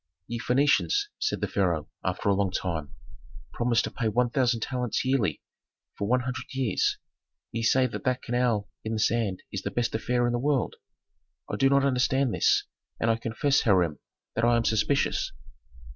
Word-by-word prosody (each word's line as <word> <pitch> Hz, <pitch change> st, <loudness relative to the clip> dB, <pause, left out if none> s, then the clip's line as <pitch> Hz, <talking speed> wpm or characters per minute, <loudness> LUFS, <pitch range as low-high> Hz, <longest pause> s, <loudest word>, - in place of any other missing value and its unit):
"Ye 115 Hz, +3 st, -4 dB
Phœnicians," 145 Hz, -, +2 dB
said 430 Hz, -, -1 dB
the -, -, 0 dB
pharaoh, 85 Hz, -6 st, 0 dB, 0.2 s
after -, -, -2 dB
a 100 Hz, -, +5 dB
long 100 Hz, 0 st, +1 dB
time, 85 Hz, -5 st, -3 dB, 0.6 s
"promise 120 Hz, -1 st, +2 dB
to -, -, -4 dB
pay 115 Hz, -, -2 dB
one 120 Hz, +2 st, +1 dB
thousand 120 Hz, -3 st, +1 dB
talents 125 Hz, -1 st, -2 dB
yearly 130 Hz, -5 st, 0 dB, 0.5 s
for 100 Hz, -, -3 dB
one 125 Hz, +3 st, +3 dB
hundred 130 Hz, +1 st, -4 dB
years. 130 Hz, -7 st, +1 dB, 0.5 s
Ye 115 Hz, -, -3 dB
say 130 Hz, +3 st, +4 dB
that 125 Hz, -, -4 dB
that 125 Hz, 0 st, 0 dB
canal 120 Hz, -3 st, +1 dB
dug 100 Hz, -, -21 dB, 0.2 s
in 110 Hz, -, -3 dB
the 110 Hz, -, -1 dB
sand 110 Hz, -4 st, 0 dB
is 95 Hz, -, -3 dB
the 100 Hz, -, -3 dB
best 120 Hz, +4 st, -1 dB
affair 120 Hz, +2 st, 0 dB
in 120 Hz, -, 0 dB
the 120 Hz, -, 0 dB
world. 140 Hz, -1 st, 0 dB, 0.7 s
I -, -, -1 dB
do 135 Hz, 0 st, +3 dB
not 140 Hz, 0 st, +4 dB
understand 130 Hz, -1 st, +2 dB
this, -, -, +3 dB, 0.4 s
and 115 Hz, -, +2 dB
I -, -, +2 dB
confess, 115 Hz, +5 st, +1 dB
Hiram, 90 Hz, -, +2 dB, 0.3 s
that 115 Hz, -, -1 dB
I 120 Hz, 0 st, +4 dB
am 115 Hz, -, 0 dB
suspicious." 135 Hz, +6 st, +1 dB
120 Hz, 185 wpm, -27 LUFS, 110-130 Hz, 0.7 s, a